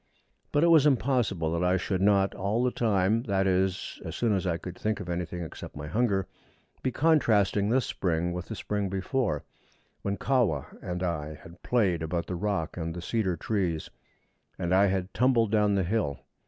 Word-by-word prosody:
But 145 - +3
it 170 - +5
was 155 -3 +6
impossible 120 - +1
that 85 +1 0
I 90 +1 +3
should 95 0 -2
not 100 -1 +3
all 105 +6 0
the 125 - +2
time 110 -1 +2
that 95 -1 +1
is, 95 0 0
as - - -6
soon 115 -3 +1
as 95 -1 0
I 85 -2 +1
could 90 +1 -8
think 110 +2 -2
of - - -6
anything 90 0 -3
except 80 - -9
my 75 - -5
hunger 100 +2 0 0.5
be 130 - 0
contrasting 110 -10 +3
this 130 +2 +2
spring 85 -1 -1
with 90 0 -5
the 110 - -5
spring 100 +1 -2
before, 95 - -1 0.6
when 100 0 -2
Kahwa 115 - 0
and 90 0 -4
I 80 -3 -2
had 80 +3 -14
played 100 -9 +1
about 85 +1 -2
the - - -5
rock 95 -3 -2
and 85 -1 -3
the 90 - -5
cedar 95 -4 0
trees, 90 -7 -2 0.7
and 85 +1 -1
I 100 +2 +5
had 95 0 -2
tumbled 120 -3 +3
down 105 -2 +3
the 95 - +2
hill. 85 - -1
95 Hz, 190 wpm, -28 LUFS, 85-110 Hz, 0.7 s, was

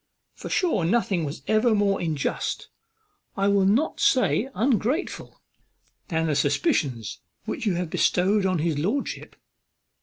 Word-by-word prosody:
for - - -9
sure 345 - +1
nothing 185 -2 +1
was 145 +1 -6
ever 220 +1 +3
more 200 -1 +1
unjust, 160 -5 -2 0.7
I 195 0 +2
will 200 -1 +3
not 245 +11 +1
say 220 - +2
ungrateful, 250 - -1 0.7
than 160 -1 -1
the 155 -2 0
suspicions 140 -5 0 0.3
which 225 - -3
you 190 - +1
have 175 -2 -3
bestowed 195 +3 +2
on 185 -1 +1
his 155 -2 -1
lordship. 215 - -3
190 Hz, 130 wpm, -25 LUFS, 160-220 Hz, 0.7 s, ever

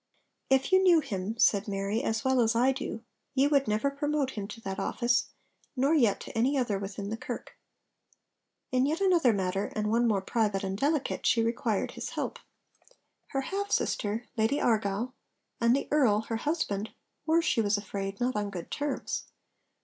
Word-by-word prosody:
'If 265 +3 +3
you 375 0 +6
knew 355 -3 +6
him,' 210 -5 -4
said 205 -2 +3
Mary, 200 +2 -1
'as 225 +2 -1
well 260 -1 +3
as 225 0 +2
I 250 +3 +4
do, 250 -4 -5 0.3
ye 270 +1 +4
would 280 -2 +3
never 215 +6 +1
promote 290 -1 -1
him 205 -4 -5
to 225 +1 -9
that 195 -2 -4
office, 240 0 +1 0.5
nor 275 +4 +2
yet 235 -10 +3
to - - -9
any 255 +5 +2
other 220 -7 0
within 200 +1 -5
the 225 - -2
Kirk.' 255 - -7 1.2
In 255 +1 +3
yet 315 +3 0
another 355 -10 +4
matter, 195 -1 -1
and 210 0 0
one 235 +1 +3
more 200 -4 +1
private 210 -3 0
and 190 0 -2
delicate, 285 +6 0
she 230 - +4
required 230 -2 -1
his - - -6
help. - - -4 0.9
Her 270 - -2
half 400 +8 -3
sister, 215 +3 0
Lady 225 +6 +2
Argyll, 220 +2 0 0.5
and 235 +1 +4
the 280 - -2
Earl, 245 -8 +4
her 225 0 -3
husband, 225 -8 -1 0.4
were, 330 +1 +4
she 240 - +2
was 205 -1 +2
afraid, 195 -1 -5
not 245 0 0
on 205 -1 -1
good 180 -4 -7
terms. 290 -1 -3
230 Hz, 180 wpm, -29 LUFS, 205-275 Hz, 1.2 s, you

